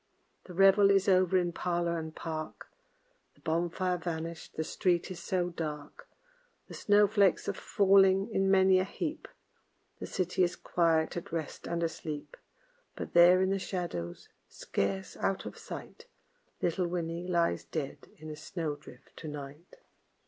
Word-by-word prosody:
The 180 - -10
revel 195 +1 +6
is 195 -1 +3
over 185 -1 +4
in 175 -1 +1
parlor 170 -1 -1
and 160 -1 -7
park, 155 -1 -6 0.7
The - - -26
bonfire 175 +2 -1
vanished, 165 -1 -5
the 160 - -1
street 175 +2 0
is 180 - -6
so 180 0 -1
dark; 150 -3 -6 0.6
The - - -11
snow 205 0 +4
flakes 200 -3 +2
are 200 - 0
falling 195 0 +4
in 195 0 +2
many 190 -1 +5
a - - +2
heap, 305 - -5 0.7
The - - -5
city 185 0 -1
is 175 - 0
quiet, 165 -1 +1
at 175 - -6
rest, 160 -3 -5
and 170 0 -1
asleep; 160 - -5 0.6
But - - -6
there 175 +2 +7
in 190 - +1
the 195 - 0
shadows, 170 - -4 0.2
scarce 190 -1 -3
out 195 - -1
of - - -7
sight, 465 - -9 0.6
Little 175 +1 +1
Winnie 170 0 -3
lies 170 -2 +1
dead 150 -4 -5
in 155 0 -8
a - - -6
snow 155 -1 -4
drift 130 -3 -16
to 160 - -8
night. 145 +3 -9
175 Hz, 155 wpm, -30 LUFS, 160-190 Hz, 0.7 s, there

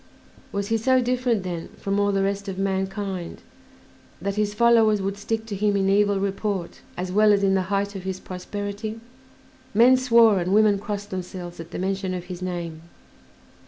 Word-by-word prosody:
Was 200 -1 -3
he 225 - +2
so 260 +3 +3
different, 245 -4 0
then, 175 -3 -4
from 200 0 -1
all 205 0 +2
the 195 -1 +1
rest 200 +1 -2
of 190 -1 -4
mankind 195 -1 -3 0.8
that 200 +4 -2
his 210 0 -1
followers 225 -2 +4
would 195 +1 -2
stick 220 +2 -3
to 215 -3 -5
him 205 0 +1
in 195 0 +1
evil 200 0 +3
report 195 -2 -3 0.2
as 180 0 -3
well 210 +2 +5
as 200 -1 +3
in 195 -1 +3
the 190 - +2
height 200 0 -1
of 195 - -5
his 190 0 -4
prosperity? 205 +4 -5 0.8
Men 245 +4 +7
swore 230 -5 +5
and 180 +3 0
women 210 -2 +4
crossed 205 -1 -5
themselves 180 -2 -6
at 165 0 -8
the - - -6
mention 190 0 -2
of 180 - -5
his 180 0 -8
name. 170 -3 -4
200 Hz, 185 wpm, -24 LUFS, 190-210 Hz, 0.8 s, Men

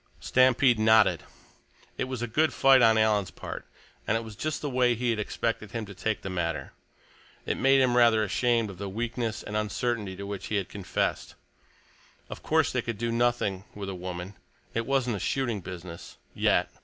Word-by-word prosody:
Stampede 130 -2 +4
nodded. 110 0 +5 0.7
It - - -2
was 130 -2 -4
a - - -1
good 155 +8 +1
fight 135 -1 +6
on 110 -1 +5
Alan's 105 -3 +2
part, - - -8 0.4
and 110 - +2
it 115 - -4
was 110 -2 -9
just 155 +7 -3
the - - -1
way 125 -1 +3
he 120 +1 0
had 110 - -2
expected 110 -1 -3
him 115 -2 -3
to 100 - -10
take 110 +3 -2
the 95 - -4
matter. 85 -6 -3 0.7
It - - -1
made 135 0 +5
him 125 -2 +3
rather 115 -3 +5
ashamed 115 0 +1
of 90 - -13
the 100 -1 -4
weakness 115 +1 -3
and 105 - -6
uncertainty 105 -1 -2
to 100 +1 -7
which 100 -1 -5
he 105 - -2
had 100 -3 -1
confessed. 100 -3 -2 1.0
Of - - -7
course - - +2
they - - 0
could 115 -3 -4
do 115 +1 -2
nothing 115 -5 0
with 100 -1 -5
a - - -4
woman; 90 +1 -6 0.4
it 115 0 -2
wasn't 130 -5 +1
a - - -6
shooting 120 -5 -1
business—yet. 85 -1 -3
110 Hz, 190 wpm, -27 LUFS, 100-120 Hz, 1.0 s, fight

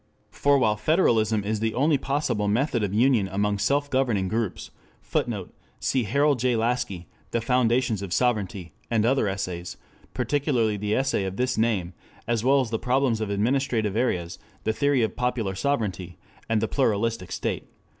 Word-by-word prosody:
For 140 0 +3
while 110 -5 +2
federalism 110 - +2
is 105 +1 -1
the 110 0 -1
only 145 +2 +3
possible 135 -7 -1
method 120 +3 +1
of 100 -2 -1
union 115 -1 +3
among 100 +1 -1
self 145 +6 +1
governing 120 -9 0
groups, 110 -3 -3 0.3
[Footnote: - - -3 0.3
Cf. 135 +4 +2
H. 130 - -5
J. 125 0 +2
Laski, 115 -7 -1 0.2
The 115 - 0
Foundations 120 -2 +1
of 100 -3 -6
Sovereignty, 100 -7 -1 0.2
and 115 -2 +2
other 130 -2 +2
Essays, 90 -3 -4 0.4
particularly 125 -3 +1
the 105 +1 -1
Essay 130 -6 +1
of 95 +1 -4
this 125 0 0
name, 105 -6 0 0.3
as 115 -1 0
well 135 +2 +4
as 120 -3 -4
the 110 - -1
Problems 125 -3 +1
of 110 - -2
Administrative 110 0 0
Areas, 90 -8 -1 0.2
The 110 - 0
Theory 140 0 +2
of 110 - -2
Popular 125 -5 -1
Sovereignty, 95 -6 -2 0.3
and 110 -1 +2
The 110 - 0
Pluralistic 115 -7 0
State. - - -3
115 Hz, 165 wpm, -25 LUFS, 100-130 Hz, 0.4 s, well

